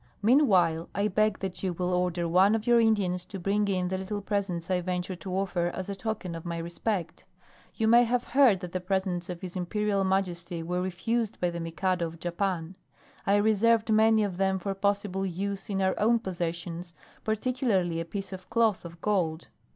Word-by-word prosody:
Meanwhile, 190 - +4
I 205 +1 +1
beg 215 +1 +2
that 190 -2 -4
you 185 -2 -1
will 180 +1 -1
order 180 -1 0
one 190 +5 +4
of 220 -1 -3
your 240 -1 +5
Indians 200 -6 +2
to 195 - -7
bring 200 +3 +1
in 185 -2 0
the 190 0 -2
little 205 +2 -3
presents 195 -4 -2
I 180 -1 +2
venture 180 +1 -3
to 185 0 -5
offer 180 -3 0
as 190 +1 -5
a 200 - -3
token 195 -3 -4
of 165 -1 -6
my 170 -1 -4
respect. 170 +1 -3 0.5
You 220 - +1
may 235 +2 +7
have 245 +1 0
heard 240 -7 +4
that 180 -2 -6
the 185 - -2
presents 185 -1 -2
of 175 -1 -5
his 180 -1 -6
Imperial 200 +2 0
Majesty 180 -3 -1
were 180 +2 -1
refused 215 +5 -2
by 175 -1 +1
the 170 - -5
Mikado 170 +1 -1
of 165 0 -11
Japan. 175 -1 -2 0.5
I 200 - +5
reserved 220 +2 +3
many 220 0 +5
of 195 -4 -3
them 190 0 +1
for 195 +1 -3
possible 200 -1 -1
use 195 +2 -3
in 195 -1 0
our 190 0 +2
own 230 +3 +4
possessions, 175 -3 -4 0.3
particularly 220 - 0
a 165 - -3
piece 195 +2 -6
of 185 -1 -9
cloth 225 -4 +2
of 170 0 -10
gold. 175 -6 0
190 Hz, 195 wpm, -28 LUFS, 175-210 Hz, 0.5 s, may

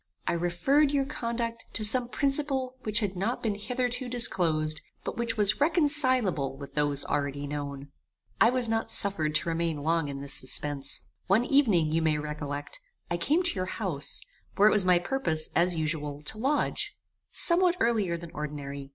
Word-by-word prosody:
I - - 0
referred 175 - +2
your 280 -2 +1
conduct 230 -3 -4
to 220 - -3
some 240 +3 +3
principle 275 -2 -1
which 215 0 -1
had 200 -3 -2
not 205 +7 -2
been 220 -3 0
hitherto 245 +4 -3
disclosed, 160 -10 0 0.2
but - - -5
which 230 -1 -2
was 210 +4 +2
reconcileable 255 - +3
with 140 0 -10
those 145 -1 0
already 140 0 -2
known. 140 -1 -6 0.5
"I 230 - +6
was 250 -1 +2
not 225 0 -1
suffered 160 -7 +3
to 170 - 0
remain 165 -1 -1
long 160 +1 0
in 140 -1 -6
this 140 0 +1
suspence. 140 +1 +1 0.2
One 205 +5 +3
evening, 210 - +3
you 165 +1 +1
may 155 -1 +1
recollect, 150 - -6 0.3
I 175 - 0
came 300 - +1
to 345 - 0
your 185 -1 -2
house, 170 -10 -3 0.4
where 205 - +5
it - - +5
was 205 -3 +3
my 180 -1 +5
purpose, 175 -6 0
as 175 +1 +2
usual, 150 -2 -3
to 215 +8 -5
lodge, 280 +5 -1 0.3
somewhat 350 0 +4
earlier 210 -7 +1
than 170 0 -10
ordinary. 140 -2 -6
185 Hz, 170 wpm, -28 LUFS, 150-245 Hz, 0.5 s, I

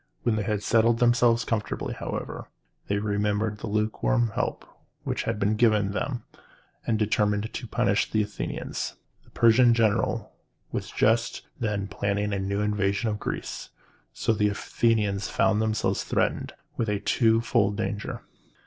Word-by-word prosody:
When 115 -3 +2
they 110 - 0
had 105 -1 -1
settled 115 0 +3
themselves 120 0 +3
comfortably, 110 -2 -2
however, - - -5 0.4
they 100 - 0
remembered 105 +1 0
the - - -5
lukewarm 110 +2 +1
help - - -2 0.4
which - - -2
had 115 -1 -1
been 105 +2 +2
given 105 -3 +3
them, 120 +4 -3 0.6
and 115 - +2
determined 105 0 +1
to 120 - -5
punish 100 -1 +1
the 110 -1 +2
Athenians. 105 0 -4 0.3
The - - -23
Persian 120 +1 +5
general 110 -3 +1 0.4
was - - -3
just 115 +2 +1 0.2
then 105 -4 -1
planning 100 +1 -1
a 100 - -1
new 100 +1 -1
invasion 105 +1 0
of 105 - -4
Greece, - - -5 0.4
so 115 - 0
the 105 -1 +2
Athenians 105 -1 0
found 110 -1 +2
themselves 110 -1 0
threatened - - -1 0.2
with 115 - 0
a 105 -1 0
twofold 115 -3 +2
danger. 110 -1 -3
105 Hz, 145 wpm, -26 LUFS, 105-115 Hz, 0.6 s, Persian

